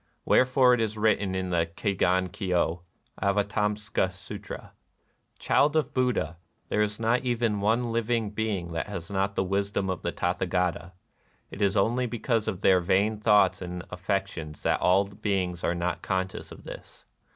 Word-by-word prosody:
Wherefore 130 0 +5
it 125 - +2
is 110 -1 -1
written 105 -3 +1
in 95 -1 -2
the 85 -1 +1
Kegon 95 -2 +1
Kyo 90 -3 0 0.4
(Avatamsaka 105 0 0
Sutra): 100 +2 -9 0.3
" - - -43 0.3
Child 145 +2 +2
of 155 -4 +1
Buddha, 125 - 0 0.3
there 105 - +1
is 105 0 -1
not 115 +3 +1
even 115 -4 0
one 115 +3 +1
living 115 -2 0
being 105 -5 -2
that 80 - -3
has 95 -3 -6
not 100 0 0
the - - +1
wisdom 100 0 -1
of 90 - -4
the 85 - -2
Tathagata. 90 -1 -1 0.6
It 105 - -8
is 100 0 +2
only 120 +5 +2
because 115 -1 -1
of 100 -3 -3
their 95 -1 +5
vain 100 +4 +1
thoughts 105 -2 +4
and 90 -1 -5
affections 90 -5 -3
that - - +1
all 95 +2 +4
beings 95 -3 -2
are 85 - +1
not 85 +1 -2
conscious 95 0 -3
of - - -11
this. - - -11
100 Hz, 165 wpm, -27 LUFS, 90-110 Hz, 0.6 s, Wherefore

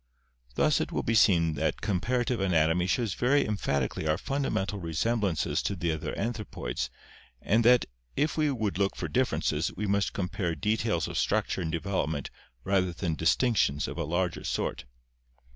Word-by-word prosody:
Thus - - +3
it - - -3
will - - -1
be 115 - 0
seen 85 -7 +4
that 70 - -1
comparative 120 +5 0
anatomy 90 -1 +2
shows 110 +1 0
very 135 +4 +2
em 105 - 0
phatically 70 -3 -1
our 75 - +2
fundamental 105 -7 -2
resemblances 95 +3 0
to 100 - -2
the 85 -2 -1
other 80 -1 -4
anthropoids 105 - -3 0.5
and 115 - +2
that 125 0 +6 0.3
if 150 +2 +1
we 155 -1 +2
would 110 -8 -1
look 100 -1 +1
for - - -3
differences - - 0
we 105 - -2
must 100 0 +1
compare 90 -3 -2
details 105 -3 0
of - - -2
structure - - 0
and 80 -2 -2
development 80 -5 -2 0.3
rather 95 -2 +1
than 85 -1 -2
distinctions 80 - +2
of - - -6
a - - 0
larger 85 +3 -1
sort. - - -2
95 Hz, 160 wpm, -28 LUFS, 80-110 Hz, 0.5 s, that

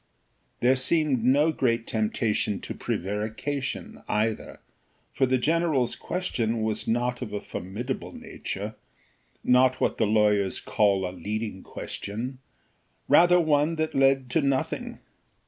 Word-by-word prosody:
There 125 +2 +5
seemed 135 -2 +1
no 145 +6 +4
great 115 -6 0
temptation 110 -2 0
to - - -5
prevarication 110 +8 -3
either, 110 +1 -1 0.5
for 130 - +2
the 130 +1 +3
general's 155 -3 +1
question 115 -11 -2
was 110 -1 -2
not 125 +2 0
of 110 -4 -5
a 105 - -1
formidable 105 +11 -5
nature, 110 - -6 0.7
not 130 +1 +4
what - - 0
the 110 - +3
lawyers 105 -2 +2
call 100 -3 +2
a 90 - -6
leading 105 +2 -4
question, 120 +6 -6 0.7
rather 175 +1 +6
one 155 0 +2
that 155 0 -1
led 135 -2 +3
to 160 - +3
nothing. 140 -2 -1
125 Hz, 125 wpm, -26 LUFS, 105-140 Hz, 0.7 s, rather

